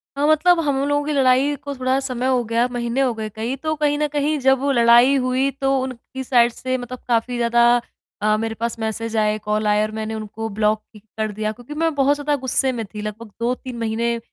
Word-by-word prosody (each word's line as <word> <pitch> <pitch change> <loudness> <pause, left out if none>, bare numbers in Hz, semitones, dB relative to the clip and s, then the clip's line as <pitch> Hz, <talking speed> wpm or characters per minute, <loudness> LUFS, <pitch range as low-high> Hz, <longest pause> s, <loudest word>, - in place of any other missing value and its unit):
हाँ, 285 +1 +1
मतलब 325 +3 +4
हम 275 -1 +1
लोगों 290 0 +1
की 305 - -2
लड़ाई 270 +1 +3
को 280 0 -7
थोड़ा 260 +1 0
समय 255 -2 -3
हो 255 -2 +2
गया, 230 +2 +1
महीने 240 +1 -1
हो 255 -3 +2
गए 220 -1 -5
कई, 225 +5 -4
तो 310 +3 -2
कहीं 295 -1 +1
न 300 - +1
कहीं 295 +1 +1
जब 265 0 +3
वो 280 +1 0
लड़ाई 240 +2 +6
हुई 260 +1 +1
तो 270 0 +2
उनकी 260 +1 -6
साइड 240 -2 +4
से 255 0 -2
मतलब 250 0 -7
काफ़ी 240 +1 0
ज़्यादा 240 0 +4 0.4
अ, 215 0 +2
मेरे 225 0 -3
पास 235 +1 -3
मैसेज 225 +1 -3
आए, 215 0 +2
कॉल 210 0 -1
आए 210 0 +3
और 215 - -3
मैंने 220 0 -4
उनको 220 +1 -5
ब्लॉक 215 +1 +1 0.4
कर 215 -1 -1
दिया 215 +1 -2
क्योंकि 245 +6 -10
मैं 325 +1 0
बहुत 280 +1 +3
ज़्यादा 290 0 -1
गुस्से 260 +1 +1
में 230 -3 -4
थी, 210 +1 -8
लगभग 215 +1 -7
2-3 250 +1 -3
महीने, 230 +1 -1
245 Hz, 220 wpm, -21 LUFS, 225-270 Hz, 0.4 s, लड़ाई